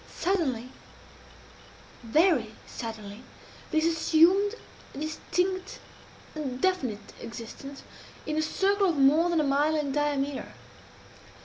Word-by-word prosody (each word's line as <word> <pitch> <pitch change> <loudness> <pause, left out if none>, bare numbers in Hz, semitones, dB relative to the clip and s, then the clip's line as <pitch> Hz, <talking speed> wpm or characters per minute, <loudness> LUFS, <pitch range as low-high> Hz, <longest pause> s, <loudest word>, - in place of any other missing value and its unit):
Suddenly 275 -11 0 1.3
very 245 - +2
suddenly 220 -2 -7 0.5
this 315 -1 +2
assumed 335 +5 +4 0.4
a - - -8
distinct 365 +5 -2 0.6
and 270 -5 -4
definite 255 - -1
existence, 235 +4 -8 0.4
in 305 - -2
a 310 - +2
circle 390 +4 +2
of 325 - -1
more 300 +5 +5
than 340 -2 +2
a - - +3
mile 290 +2 +2
in 295 -2 -1
diameter. 285 -1 -1
300 Hz, 105 wpm, -28 LUFS, 260-345 Hz, 1.3 s, more